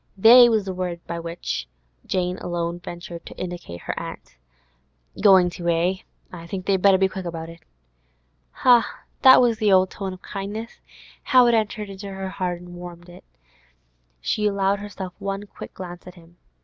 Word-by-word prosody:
'They' 240 +4 +8
was 220 -3 +1
the 190 - -4
word 180 -2 -4
by 170 0 -5
which 165 - -4 0.4
alone 175 -2 -2
Jane - - -14
ventured 175 -1 -8
to - - -11
indicate 175 - -7
her - - -3
aunt. - - -9 0.9
'Going 185 -3 +6
to, 175 -1 -3
eh? 170 +3 +1 0.4
I 170 -1 -9
think 185 +1 -5
they'd 190 -2 +1
better 195 -1 +6
be 190 0 +3
quick 190 -1 -7
about 165 -1 -5
it.' 165 0 -13 1.0
Ha! 240 -4 +4 0.2
that 260 0 +9
was 235 -3 +2
the 210 -3 +3
old 185 -1 +4
tone 195 -2 -5
of 185 - -13
kindness! 210 +4 -6 0.4
How 255 -3 +5
it 240 - +4
entered 215 -2 -1
into 195 +1 -8
her 190 -1 -6
blood 180 -1 0
and 175 0 -12
warmed 175 0 -10
it! 175 - -14 1.0
She 210 - 0
allowed 200 0 +1
herself 195 -3 -7
one 195 +1 -4
quick - - -11
glance 175 -1 -9
at 180 - -11
him. 170 0 -19
185 Hz, 175 wpm, -23 LUFS, 175-200 Hz, 1.0 s, that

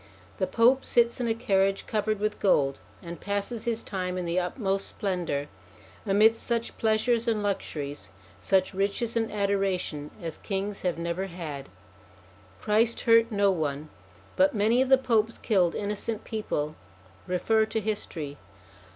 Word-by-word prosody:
The 185 - 0
Pope 240 +7 +4
sits 235 0 +2
in 240 - 0
a 225 - +1
carriage 195 -3 +1
covered 215 -1 -1
with 210 0 -1
gold, 140 -8 +2 0.2
and 170 0 -7
passes 205 +3 -3
his 230 -1 -1
time 185 -2 -3
in 180 - -2
the 170 +2 +1
utmost 195 +1 -1
splendour, 175 -8 -2 0.6
amidst 215 +3 +4
such 235 -1 -2
pleasures 225 +2 +2
and 215 -2 +1
luxuries, 145 - -3 0.3
such 190 - +2
riches 200 +4 -1
and 225 -1 0
adoration, 195 -7 -1
as 165 -4 -5
kings 200 0 -3
have 180 -2 -1
never 170 +3 -2
had. 155 -6 -7 0.9
Christ 220 - +2
hurt 230 0 +5
no 200 -1 +3
one, 150 -3 -2 0.5
but 190 +4 +3
many 220 +4 +3
of 260 - +1
the 265 - +7
Popes 230 -3 +1
killed 185 -6 +2
innocent 210 +2 -3
people: 155 -9 -3 0.5
refer 220 +5 +2
to 220 - -1
history. 170 -9 -4
200 Hz, 145 wpm, -27 LUFS, 180-225 Hz, 0.9 s, the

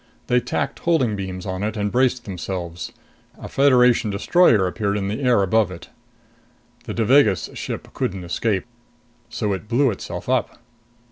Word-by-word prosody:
They 125 0 +3
tacked 125 - -3
holding 140 -11 +1
beams 95 -1 -5
on 95 -1 -4
it 110 +1 -2
and 105 -1 -1
braced 130 -1 +1
themselves. 90 -2 -5 0.5
A - - -8
Federation 125 -4 +4
destroyer 105 - +3
appeared 100 +2 -1
in 100 -1 -2
the 110 +7 -3
air 125 -6 +3
above 105 +1 +2
it. 90 -3 -10 1.0
The - - -5
Devagas 110 - +3
ship - - -5
couldn't 95 -1 -3
escape. 95 +3 -1 0.6
So 105 -4 -2
it 95 +3 -6
blew 125 +3 +2
itself 100 - -7
up. - - 0
105 Hz, 150 wpm, -22 LUFS, 95-125 Hz, 1.0 s, Federation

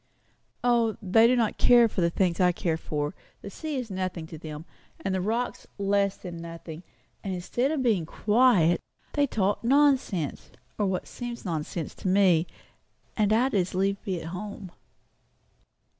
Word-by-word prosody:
"O, 235 -3 +2
they 225 +3 +5
do 250 - +4
not 230 -3 0
care 240 -1 +6
for 205 - -3
the 170 - +3
things 175 -1 0
I 180 -1 +5
care 170 -2 -1
for; 150 -2 -3 0.3
the 200 - -7
sea 310 +7 -5
is 250 -5 -4
nothing 185 -3 -3
to 160 0 -9
them, 155 0 -8 0.4
and 190 - 0
the 190 - 0
rocks 230 +6 -2
less 200 0 +1
than 175 -2 -8
nothing; 165 -1 -8 0.4
and 190 -2 -3
instead 240 +9 -1
of 295 -4 -1
being 200 -10 +1
quiet, 210 -6 +3 0.3
they 290 -1 +2
talk 205 -4 0
nonsense, 260 - +2 0.3
or 205 - +2
what 185 -1 -2
seems 240 -2 -7
nonsense 160 -1 -3
to - - -6
me; 185 -3 +4 0.7
and 210 -1 +2
I'd 245 +5 +3
as 185 -3 0
lieve 195 +1 0
be 185 -3 -2
at 165 - -7
home." 195 0 -7
195 Hz, 165 wpm, -27 LUFS, 175-230 Hz, 0.7 s, care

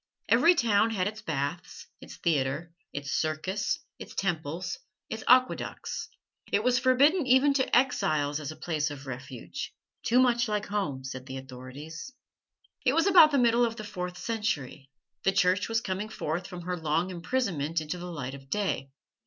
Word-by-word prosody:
Every 345 +2 +6
town 225 -5 +3
had 195 -4 0
its 215 +1 -5
baths, 155 -2 -4 0.2
its - - -10
theatre, 155 +1 -1 0.2
its 140 -1 -5
circus, 160 +6 -1 0.2
its - - -9
temples, 175 -1 -2 0.3
its 220 0 -4
aqueducts. 255 +1 +2 0.4
It 205 - +2
was 250 +1 +3
forbidden 275 +5 +4
even 265 +3 +5
to 260 -3 +3
exiles 155 - +1
as 150 -1 -5
a - - -9
place 155 -3 -1
of 140 -1 -8
refuge 130 -2 -6 0.3
too 240 - +2
much 245 -1 +4
like 210 -1 -1
home, 155 -11 -2
said 130 0 -7
the 130 -1 -5
authorities. 135 - -9 0.7
It 255 - +3
was 330 +3 +3
about 365 -6 +8
the 285 - +1
middle 240 -1 +4
of 230 -1 0
the 215 - -7
fourth 180 -3 -5
century. 155 - -3 0.3
The 195 - +2
Church 190 +1 +2
was 225 0 +1
coming 195 +2 -3
forth 175 -3 -3
from 180 -2 -8
her 180 +1 -2
long 165 +2 0
imprisonment 170 - -1
into 155 +3 -4
the 180 +1 -6
light 135 -5 -5
of 135 -1 -11
day. 195 -9 -1
180 Hz, 170 wpm, -28 LUFS, 150-230 Hz, 0.7 s, about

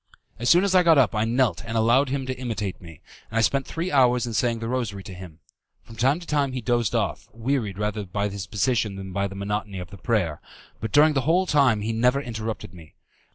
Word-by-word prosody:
As 120 - 0
soon 175 +2 +6
as 200 -1 +1
I 185 - +6
got 165 -3 +5
up 130 -5 +4
I 110 0 +1
knelt 115 -6 +1
and 115 0 -3
allowed 120 +5 +3
him 135 0 -2
to 130 0 -3
imitate 110 -7 -4
me, 80 -4 -13 0.3
and 115 - -4
I - - +4
spent 135 +4 +1
three 170 +3 -3
hours 125 -3 +3
in 120 - -5
saying 115 +1 +1
the 115 0 -5
rosary 115 -6 -3
to 95 - -9
him. 90 -3 -11 0.4
From 115 - -13
time 135 +8 +2
to 175 - -11
time 145 -4 0
he 130 - -2
dozed 120 -3 0
off, - - -2
wearied 115 -4 -2
rather 105 0 -2
by 100 +2 -2
his 100 -2 -6
position 110 -1 0
than 95 -1 -7
by 100 +1 0
the 95 - -9
monotony 100 0 -3
of 90 -1 -7
the 100 - -11
prayer, 95 -10 -1 0.4
but 110 -1 -4
during 150 +1 +5
the 135 - +1
whole 170 +7 +2
time 135 - +3
he 110 +2 -2
never 125 +4 +2
interrupted 110 -7 -5
me. 80 -3 -15
115 Hz, 240 wpm, -24 LUFS, 100-130 Hz, 0.4 s, soon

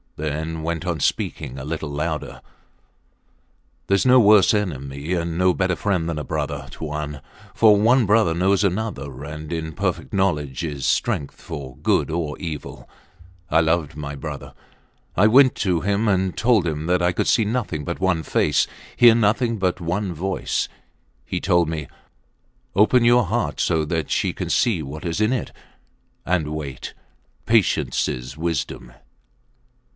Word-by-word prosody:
then 80 +2 -3
went 85 +2 -3
on 85 -3 -2
speaking 65 -1 -2
a 65 - -6
little 80 0 -4
louder: 75 +2 -4 1.5
Theres 100 +3 +2
no 130 0 +7
worse 105 -4 +6
enemy 70 -6 -3
and 85 -1 -2
no 90 0 +3
better 95 -1 0
friend 90 -5 -1
than 80 -2 -3
a - - -4
brother, - - -3
Tuan, 75 -2 -5 0.3
for 110 -2 +6
one 120 +3 +4
brother 105 -4 +3
knows 95 +4 +2
another, 90 - -3
and 75 +1 -7
in 80 -1 -4
perfect - - -2
knowledge 85 -7 -1
is 70 -5 -4
strength 70 - -1
for 65 -3 -8
good - - +1
or 80 -3 -2
evil. 80 -5 -7 0.6
I 80 +2 +4
loved 80 -2 0
my 75 -1 -6
brother. 70 - -7 0.6
I 100 - +4
went 130 +3 +6
to 90 -5 0
him 100 +3 0
and 95 -2 +1
told 115 -6 +3
him 80 0 -3
that 90 -1 +2
I 90 +1 +3
could - - -1
see 110 - +3
nothing 105 -9 -2
but 85 +3 -4
one 95 -3 +1
face, 75 -2 +1 0.3
hear 120 -2 +7
nothing 115 +1 +1
but 95 -2 0
one 90 +3 -2
voice. 95 +4 -2 0.6
He 90 - -3
told 85 -2 +2
me: 75 -3 -4 0.9
Open 110 +5 +4
your 120 0 +5
heart 90 - -2
so 80 -1 +1
that 80 -1 -2
she - - 0
can - - -5
see 110 -9 +2
what 75 +5 -8
is 85 +4 -2
in 110 +2 +3
it 130 -3 -2 0.7
and 85 -4 0
wait. 70 -5 -6 0.5
Patience 115 -4 +2
is 65 +2 -5
wisdom. 80 -6 -3
85 Hz, 155 wpm, -22 LUFS, 75-100 Hz, 1.5 s, no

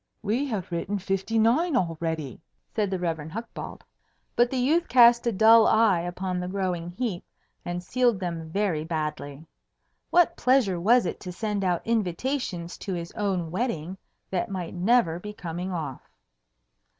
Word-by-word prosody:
"We 235 +7 0
have 195 -8 -4
written 175 +4 -2
fifty 195 +3 -2
nine 250 +9 +3
already!" 165 - -3 0.3
said 210 -3 0
the 190 - -1
Rev. 170 -3 -2
Hucbald. 225 +7 -7 0.5
But 240 0 +4
the 265 - -2
youth 315 +8 +2
cast 235 -1 +6
a - - +3
dull 220 +2 +6
eye 220 -5 +4
upon 180 +1 -3
the 180 - -3
growing 180 -3 -2
heap, 185 -1 -3 0.4
and 175 0 -4
sealed 240 +1 +1
them 170 -3 -4
very 180 -4 0
badly. 155 -2 -4 0.6
What 350 -1 +4
pleasure 250 -9 +2
was 230 +6 +4
it - - -3
to 180 - -7
send 205 +1 -2
out 180 -2 0
invitations 215 -3 -2
to 190 - -4
his 170 -1 -5
own 185 -6 -2
wedding 185 -5 -2 0.4
that 185 -2 -1
might 185 -4 -5
never 180 -3 +2
be 210 +3 -7
coming 175 0 -5
off? 155 -7 -4
190 Hz, 155 wpm, -26 LUFS, 170-230 Hz, 0.6 s, cast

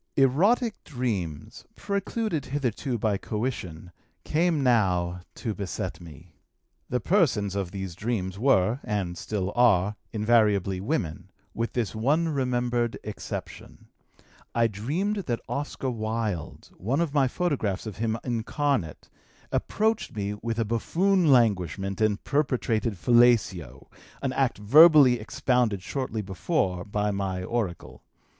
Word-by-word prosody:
"Erotic 200 - +2
dreams, 105 - -4
precluded 200 - -2
hitherto 130 -2 -2
by 105 -2 0
coition, 95 -7 -4 0.3
came 160 -2 +1
now 90 -8 +2 0.2
to 110 -4 -3
beset 100 -5 -5
me. 85 0 -13 0.6
The 125 - 0
persons 120 - +2
of 100 -3 -2
these 95 -2 -5
dreams 95 -1 -3
were 120 -2 +3
(and 95 -4 -2
still 100 0 -3
are) 105 -5 +4 0.2
invariably 105 -4 +2
women, 95 - -3 0.2
with 115 +1 -3
this 120 -4 -1
one 145 +9 +1
remembered 125 -4 0
exception: 105 -1 -8 0.7
I 115 0 +4
dreamed 145 - -1
that 120 -2 -1
Oscar 140 -2 -3
Wilde, 110 -6 -4
one 125 - -1
of 165 -4 0
my 140 -3 +3
photographs 130 - -1
of 110 -3 -7
him 110 0 -1
incarnate, 120 - -2 0.4
approached 220 - 0
me 100 -1 -2
with 115 +2 -4
a 115 - +1
buffoon 170 - +2
languishment 100 - +2
and 105 -1 +1
perpetrated 120 -7 0
fellatio, 100 - +3 0.4
an 135 -2 0
act 135 -2 +1
verbally 140 +2 +7
expounded 110 -3 0
shortly 125 -5 -3
before 95 - -1
by 105 +1 -1
my 95 -2 -2
oracle. 105 -4 -4
115 Hz, 120 wpm, -26 LUFS, 100-135 Hz, 0.7 s, verbally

